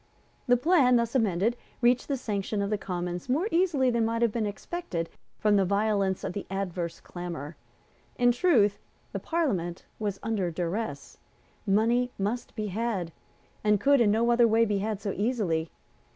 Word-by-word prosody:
The 245 0 +5
plan, 275 -3 +4
thus 235 -1 +1
amended, 220 -2 +2 0.2
received 245 0 +3
the 275 - -1
sanction 205 -3 -2
of 200 - -2
the 210 - +1
Commons 175 +2 -4
more 310 +11 +1
easily 325 -8 +2
than 235 -1 +1
might 230 +1 0
have 235 - +3
been 220 -1 -1
expected 205 - -4 0.3
from 210 -1 +3
the 195 - +4
violence 200 -1 +1
of - - -3
the 200 - -5
adverse 180 -3 -3
clamour. 170 -4 -7 0.6
In 245 0 +4
truth, 240 - +3 0.3
the - - -3
Parliament 200 - -1
was 205 -3 -2
under 215 -5 0
duress. 170 -3 -4 0.5
Money 230 +5 +3
must 210 +5 -3
be 215 -2 -2
had, 200 -4 -2 0.5
and 210 -1 +3
could 280 +1 +4
in 220 - +4
no 230 +3 +3
other 235 0 +5
way 225 +1 +4
be 205 -2 0
had 210 0 -2
so 205 -1 -3
easily. 195 -8 0
215 Hz, 165 wpm, -28 LUFS, 190-240 Hz, 0.6 s, The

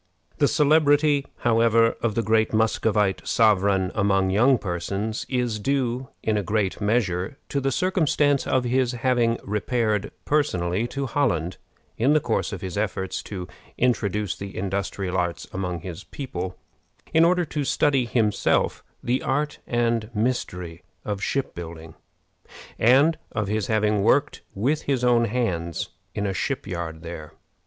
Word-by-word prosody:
The 145 - +5
celebrity, 145 -1 +3
however, 115 -1 +4
of 110 -3 0
the 115 - +1
great 110 0 +2
Muscovite 110 -2 +1
sovereign 100 -4 +3
among 95 -2 +2
young 120 +7 +4
persons 100 +4 -3
is 125 -4 -1
due 130 +1 -1
in 110 -1 +1
a - - +1
great 105 0 -1
measure 105 0 0
to 140 - -1
the 135 0 0
circumstance 150 -4 +1
of 130 - +2
his 125 0 +1
having 120 -1 +1
repaired 105 0 0 0.2
personally 105 -8 +1
to 140 +2 -3
Holland, 105 - 0 0.4
in 130 +6 +4
the 155 - +5
course 120 -3 -1
of 100 - -6
his 95 +1 -4
efforts 95 -3 -2
to 90 -4 -6 0.3
introduce 105 -6 0
the 100 +1 -8
industrial 95 -1 -2
arts 90 -2 -1
among 90 -3 -3
his 85 -2 -7
people, 95 -9 -6 0.6
in 160 - +6
order 175 +1 +3
to 150 -1 -3
study 135 -1 +2
himself 110 -3 +1 0.2
the 125 +2 0
art 150 +2 -1
and 115 -2 0
mystery 90 -7 -2 0.2
of 100 -2 -3
shipbuilding, 85 -12 -4 0.9
and 140 +8 +5
of 110 -2 -1
his 105 +1 -1
having 105 -2 +2
worked 140 +7 +2
with 135 +10 0
his 135 -3 -1
own 120 -1 +4
hands 90 -8 -2 0.3
in 100 - -1
a 100 - -1
ship 135 +7 -2
yard 85 -4 -5
there. 80 -2 -8
110 Hz, 145 wpm, -24 LUFS, 95-130 Hz, 0.9 s, in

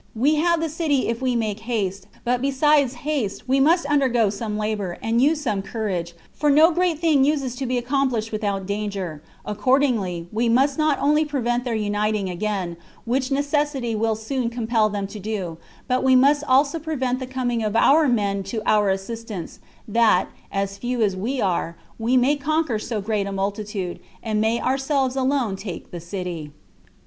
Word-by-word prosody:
We 285 +7 +2
have 340 +2 +2
the 325 - 0
city 300 -5 0
if 230 +1 -2
we 255 -2 +1
make 220 -3 -1
haste; 200 -5 -3 0.2
but 245 0 0
besides 275 0 +3
haste, 275 -11 -2
we 265 +2 +3
must 325 +4 +4
undergo 260 -7 +2
some 210 0 -4
labor, 210 -4 -2
and 230 +2 +1
use 300 +3 +3
some 215 -8 -1
courage; 190 -6 -3 0.2
for 295 - +1
no 310 +4 +6
great 350 -1 +1
thing 310 -4 +3
uses 275 -4 0
to 265 - -3
be 250 0 0
accomplished 245 -3 0
without 200 -3 -2
danger: 200 -6 -4 0.2
accordingly, 210 -6 +1
we 230 +2 +1
must 270 +5 +2
not 305 -2 +3
only 300 +2 +3
prevent 250 -4 -1
their 240 -2 -1
uniting 210 -2 0
again, 185 -2 -3 0.3
which 255 +2 0
necessity 285 -3 0
will 220 0 +1
soon 230 +3 -2
compel 230 -2 +1
them 200 -1 -3
to 205 +2 -8
do, 190 -5 -4 0.3
but 255 0 +1
we 260 -1 +5
must 280 +3 +4
also 280 +4 +3
prevent 260 -5 -2
the 260 - -5
coming 250 -3 -1
of 215 0 -2
our 300 +7 +5
own 250 -4 +3
men 200 -2 -1
to 215 +3 -4
our 210 -2 +3
assistance, 195 -1 -4 0.3
that, 220 -4 +3 0.2
as 195 0 -2
few 245 0 -1
as 195 -3 +1
we 240 +8 -2
are, 170 -4 -1 0.2
we 235 +3 +2
may 260 +4 +3
conquer 295 -4 0
so 215 -1 -3
great 205 -1 -1
a - - -4
multitude, 195 -1 -3 0.2
and 215 -2 0
may 225 +2 +1
ourselves 270 0 0
alone 260 -6 +1
take 190 -3 -7
the 175 - -6
city." 170 -4 -5
235 Hz, 180 wpm, -23 LUFS, 205-275 Hz, 0.3 s, no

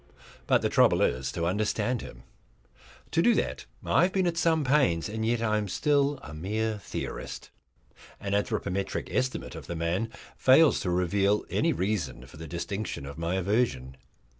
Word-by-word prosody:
But - - +3
the - - +2
trouble - - +4
is 65 +2 0
to 85 - -2
understand 105 +5 0
him. - - -11 0.9
To 165 - +3
do 235 +6 +4
that - - -2 0.2
I - - +3
have 180 - +3
been 190 -1 +1
at 170 -1 0
some 165 -2 +2
pains, 130 - +2
and 110 +1 -4
yet 115 +1 +1
I 110 -1 +2
am 105 - -3
still 145 - +1
a 75 - -9
mere 105 +6 -2
theorist. 100 - -6 0.7
An 100 0 -3
anthropometric 100 -1 -2
estimate 130 0 -1
of - - -9
the 85 - -4
man 85 +7 -1 0.3
fails 140 +4 +5
to 90 - -2
reveal 95 +4 +1
any - - +2
reason 85 - -2
for 65 - -14
the 80 +1 -8
distinction 85 -1 -4
of 70 +3 -8
my 85 +2 -1
aversion. 95 - 0
100 Hz, 170 wpm, -28 LUFS, 85-125 Hz, 0.9 s, fails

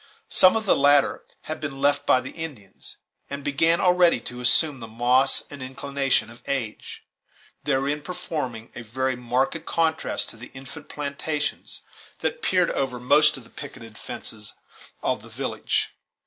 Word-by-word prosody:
Some 185 +2 +6
of 220 0 0
the - - +5
latter 145 0 +4 0.2
had 155 - -5
been 140 -3 -5
left 145 +1 +2
by 130 - +5
the 130 - -7
Indians, 140 - -7 0.3
and 140 0 -5
began 160 +4 +3
already 180 -6 +5
to 125 +1 -6
assume 140 +3 +5
the 115 - -7
moss 125 +4 +3
and 140 -2 -8
inclination 135 -2 0
of 120 - -14
age, 120 -6 -4 0.6
therein 140 +3 +1
forming 145 -8 -5
a - - -7
very 130 +3 -1
marked 125 +6 0
contrast 160 -1 0
to - - -13
the 115 - -10
infant 135 +4 -10
plantations 150 +1 -3 0.4
that 485 - -1
peered 180 - +3
over 130 -2 -1
most 145 +4 +5
of 130 - -11
the 115 - -18
picketed 125 -6 -9
fences 105 0 -7 0.5
of - - 0
the - - -13
village. - - -1
140 Hz, 155 wpm, -25 LUFS, 125-150 Hz, 0.6 s, Some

